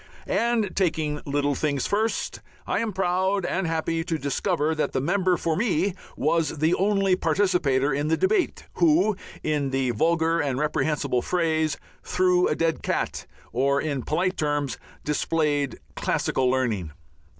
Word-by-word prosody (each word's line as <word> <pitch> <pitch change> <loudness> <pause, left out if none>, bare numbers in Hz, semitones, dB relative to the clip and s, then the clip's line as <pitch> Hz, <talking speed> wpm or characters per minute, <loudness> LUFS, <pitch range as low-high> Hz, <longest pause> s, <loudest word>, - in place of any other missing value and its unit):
And, 230 -4 0
taking 160 -5 0
little 145 0 +1
things 140 0 -1
first, 220 +2 -1 0.2
I - - 0
am 230 -1 -1
proud 190 0 0
and 185 -2 -1
happy 165 0 -1
to 165 -2 -1
discover 155 +2 0
that 155 - -1
the - - +1
member 180 +5 +1
for 165 -1 -1
me 195 -2 +1 0.2
was 160 +1 +1
the 160 +4 +2
only 195 -1 +2
participator 155 -9 +1
in 145 +2 -1
the 160 - +2
debate 380 -1 +1
who, 305 - +4 0.3
in 150 -3 0
the 135 -1 0
vulgar 165 +6 +2
and 140 -4 0
reprehensible 150 -3 0
phrase, 160 -2 0 0.2
"threw 180 -1 +2
a - - 0
dead 165 -1 0
cat," - - -2 0.3
or, 140 +3 +2
in 145 -4 -2
polite 180 +7 -1
terms, 145 -2 -1 0.2
displayed 150 -2 0 0.2
classical 130 -1 0
learning. 115 -10 0
160 Hz, 145 wpm, -25 LUFS, 145-185 Hz, 0.3 s, who